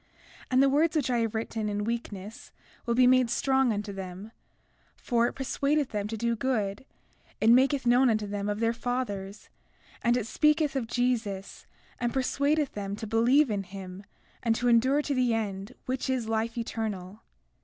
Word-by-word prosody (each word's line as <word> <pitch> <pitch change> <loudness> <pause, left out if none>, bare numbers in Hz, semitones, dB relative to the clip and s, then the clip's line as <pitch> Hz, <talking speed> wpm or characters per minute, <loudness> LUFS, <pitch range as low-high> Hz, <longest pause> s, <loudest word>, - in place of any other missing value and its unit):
And 260 +1 +4
the - - +5
words 305 +4 +2
which 280 -5 +1
I 240 - +2
have 225 -1 -1
written 220 -1 -2
in 205 0 -2
weakness 220 -2 -5 0.4
will 235 - +1
be 250 +1 +5
made 255 -1 +4
strong 265 0 +2
unto 205 -1 -3
them; 190 +2 -8 0.6
for 235 -1 +1
it - - -4
persuadeth 280 +1 0
them 205 -1 -3
to 225 +1 -4
do 235 +1 0
good; 215 -2 -2 0.5
it 225 - +5
maketh 265 +2 +4
known 245 +2 +5
unto 215 -2 +1
them 205 0 -3
of 205 0 -2
their 230 0 +2
fathers; 215 -5 -4 0.5
and 240 +1 +2
it 240 - -2
speaketh 300 +5 +2
of 250 -4 -1
Jesus, 225 -6 -2 0.3
and 240 -1 0
persuadeth 280 +3 0
them 200 -1 -4
to 220 - -6
believe 235 +5 +3
in 205 -1 -1
him, 190 0 -9 0.4
and 230 -2 +1
to 245 +2 -1
endure 260 +5 +3
to 290 - -1
the 250 -3 +2
end, 205 +1 -4
which 260 +1 -2
is 255 -4 -1
life 225 +1 -1
eternal. 215 -4 -4
230 Hz, 175 wpm, -28 LUFS, 210-255 Hz, 0.6 s, the